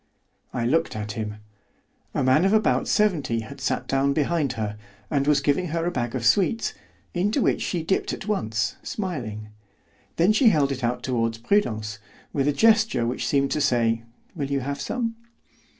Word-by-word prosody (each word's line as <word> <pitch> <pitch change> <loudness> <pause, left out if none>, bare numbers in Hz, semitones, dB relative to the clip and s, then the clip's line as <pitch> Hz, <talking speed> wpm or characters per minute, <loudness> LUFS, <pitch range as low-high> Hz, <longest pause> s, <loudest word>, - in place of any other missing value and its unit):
I 120 - -2
looked 160 +4 +1
at 105 -1 -4
him. 105 0 -4 0.8
A - - +1
man 130 +6 +4
of 195 +2 +3
about 220 -1 +2
seventy 150 - +1
had 135 +5 -10
sat 130 - -1
down 135 +1 +2
behind 150 -2 0
her, 105 -3 -3 0.4
and 140 -1 +1
was 145 -2 +4
giving 145 +6 +1
her 165 +1 -2
a 175 - 0
bag 120 -4 -2
of 120 -3 -2
sweets, 195 - +2 0.4
into 205 +8 +1
which - - +1
she 175 -3 -2
dipped 190 +4 0
at - - -6
once, 110 - -1
smiling. 120 - -4 0.7
Then 180 +6 +4
she 225 +2 +6
held 145 -7 +2
it 130 -1 -4
out 120 +1 -1
toward 115 -3 0
Prudence, 110 - 0 0.3
with 140 -1 +1
a - - +4
gesture 220 - +3
which 120 +2 -2
seemed 140 -1 +2
to 150 - 0
say, 115 -3 +2 0.3
"Will 140 -4 -3
you 140 -1 0
have 140 +2 -4
some?" 230 -2 -2
140 Hz, 180 wpm, -25 LUFS, 120-175 Hz, 0.8 s, she